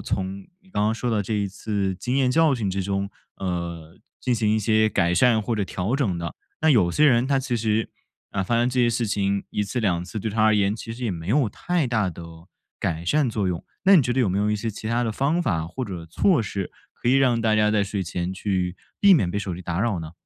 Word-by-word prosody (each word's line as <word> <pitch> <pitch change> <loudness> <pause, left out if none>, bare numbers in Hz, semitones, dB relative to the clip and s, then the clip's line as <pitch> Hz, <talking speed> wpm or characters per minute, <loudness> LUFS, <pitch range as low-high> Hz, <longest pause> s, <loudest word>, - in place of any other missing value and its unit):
从 95 +1 -4
你 190 - -24
刚 105 - 0
刚 110 - +1
说 120 +2 -2
的 110 -2 +1
这 110 - -2
一 100 -1 0
次 100 -1 -2
经 125 +6 -2
验 130 -2 +3
教 160 0 +4
训 110 -6 -2
之 95 +1 -2
中， 100 0 -2 0.3
呃， 85 -2 -4 0.2
进 125 - 0
行 110 -2 +1
一 110 - +1
些 110 +1 +3
改 90 -4 +1
善 110 +4 +4
或 115 +1 -2
者 100 - 0
调 95 +7 -2
整 105 -11 0
的， 85 -1 -5 0.2
那 160 - +4
有 105 -11 +4
些 150 - +3
人 120 -2 +4
他 135 0 +2
其 130 -2 -2
实， 110 -1 0 0.4
啊， 100 - -1
发 105 +5 -1
生 120 +1 +2
这 125 0 +1
些 120 - +4
事 120 0 0
情， 100 -1 0
1 105 - -1
次 120 +5 -3
2 90 -5 +1
次 95 +4 -6
对 110 +1 -3
他 110 +1 0
而 110 -1 +5
言 100 +1 +2
其 115 0 -7
实 125 +2 -6
也 115 - 0
没 85 -1 -6
有 130 +1 +3
太 175 - -1
大 110 -6 +1
的 85 0 -8 0.6
改 85 0 -2
善 145 - +2
作 105 -4 -1
用， 90 -2 -2 0.2
那 195 - +7
你 - - +7
觉 120 0 -1
得 130 - +2
有 105 -7 +2
没 95 - 0
有 105 +1 +1
一 105 - +1
些 115 +2 -3
其 110 +1 -8
它 120 +1 +1
的 110 - -1
方 150 +9 +1
法 85 - -1
或 125 +10 -5
者 85 -5 -7
措 155 - +2
施 100 -2 -4 0.2
可 120 - -1
以 - - +4
让 130 -3 +3
大 110 -1 +3
家 105 0 +3
在 105 -2 +2
睡 100 -1 -3
前 90 +1 -3
去 95 -2 -2 0.2
避 200 -1 +6
免 100 - +3
被 100 - -2
手 100 -3 -4
机 90 - -8
打 85 -1 -3
扰 105 -4 0
呢？ 80 0 -8
105 Hz, 280 characters per minute, -24 LUFS, 95-120 Hz, 0.6 s, 那